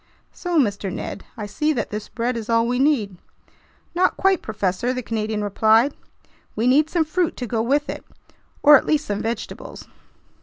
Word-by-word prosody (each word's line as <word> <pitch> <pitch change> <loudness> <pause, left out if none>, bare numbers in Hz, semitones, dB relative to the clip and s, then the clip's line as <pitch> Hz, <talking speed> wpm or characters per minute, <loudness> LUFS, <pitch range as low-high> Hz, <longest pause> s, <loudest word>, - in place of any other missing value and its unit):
"So, 355 -2 -2
Mr. 200 -6 0
Ned, 190 - -6
I 210 - -4
see 300 +9 0
that 235 -6 -3
this 210 0 -5
bread 245 +1 -2
is 230 -1 -5
all 230 0 +3
we 245 +1 0
need—" 245 -10 +1 0.8
"Not 365 +1 +2
quite, 385 -1 +2
professor," 210 +3 -1
the 255 -1 -4
Canadian 215 -2 -2
replied. 220 +6 +3 0.6
"We 225 - 0
need 290 +5 +4
some 330 -2 +1
fruit 335 +2 -1
to 250 - -3
go 225 -1 -1
with 280 +6 +1
it, - - -6 0.6
or 295 0 +9
at - - -4
least 305 -1 +1
some 205 0 -2
vegetables." 225 -1 -5
235 Hz, 180 wpm, -22 LUFS, 215-295 Hz, 0.8 s, or